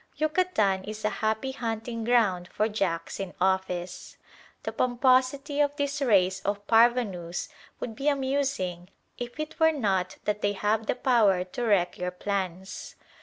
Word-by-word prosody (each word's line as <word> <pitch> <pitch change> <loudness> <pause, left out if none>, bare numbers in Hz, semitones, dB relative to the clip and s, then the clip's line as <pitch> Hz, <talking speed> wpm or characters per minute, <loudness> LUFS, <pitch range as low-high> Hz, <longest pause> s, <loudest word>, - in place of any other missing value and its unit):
Yucatan 305 - +1
is 215 +1 -6
a 215 - +2
happy 220 +4 0
hunting 230 -2 -4
ground 215 -7 +2
for 215 - +1
"Jacks 185 -6 -2
in 195 -2 -5
Office." 185 -1 -1 0.5
The - - -3
pomposity 255 +3 +2
of 290 0 +1
this 285 0 -2
race 195 -7 +3
of 205 +1 -2
parvenus 225 -7 +2 0.3
would 225 - -5
be 275 +4 -3
amusing 265 -11 -1 0.3
if 245 +4 -6
it 310 +1 -5
were 320 0 +6
not 195 - -1
that 210 0 -1
they 205 0 +1
have 210 +2 0
the - - +1
power 220 -8 +3
to 215 +7 -5
wreck 185 -5 +2
your 180 0 -1
plans. 190 0 -4
215 Hz, 150 wpm, -27 LUFS, 190-255 Hz, 0.5 s, were